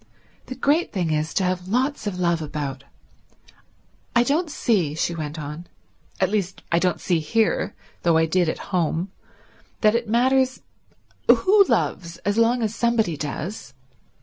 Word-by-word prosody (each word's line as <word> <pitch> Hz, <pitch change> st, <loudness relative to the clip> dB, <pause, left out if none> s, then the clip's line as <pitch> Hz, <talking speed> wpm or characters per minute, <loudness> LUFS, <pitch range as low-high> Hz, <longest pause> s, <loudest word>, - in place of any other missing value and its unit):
The 255 Hz, -, -6 dB
great 290 Hz, +6 st, +1 dB
thing 175 Hz, -5 st, -1 dB
is 155 Hz, +1 st, 0 dB
to 195 Hz, -, +2 dB
have 180 Hz, 0 st, -1 dB
lots 250 Hz, +2 st, 0 dB
of 190 Hz, -3 st, -3 dB
love 170 Hz, -2 st, +1 dB
about. 140 Hz, -3 st, -5 dB, 1.3 s
I 235 Hz, -, +6 dB
don't 310 Hz, +7 st, 0 dB
see," 195 Hz, -, 0 dB
she 170 Hz, -, -1 dB
went 155 Hz, -2 st, -5 dB
on, 150 Hz, +3 st, -7 dB, 0.5 s
"at 190 Hz, 0 st, +2 dB
least 195 Hz, -3 st, -2 dB
I 170 Hz, -, +4 dB
don't 180 Hz, 0 st, 0 dB
see 175 Hz, -3 st, +1 dB
here, 220 Hz, +8 st, 0 dB, 0.3 s
though 170 Hz, -2 st, +3 dB
I 160 Hz, -, +4 dB
did 175 Hz, +1 st, +1 dB
at 175 Hz, -, -6 dB
home, 175 Hz, +1 st, 0 dB, 0.7 s
that 215 Hz, -1 st, +5 dB
it 230 Hz, -1 st, -1 dB
matters 260 Hz, +2 st, +2 dB, 0.7 s
who 400 Hz, +1 st, +6 dB
loves 170 Hz, -, -1 dB
as 205 Hz, +3 st, +1 dB
long 235 Hz, +1 st, +3 dB
as 215 Hz, -1 st, -1 dB
somebody 225 Hz, -8 st, +1 dB
does. 145 Hz, -, -5 dB
185 Hz, 155 wpm, -23 LUFS, 160-235 Hz, 1.3 s, I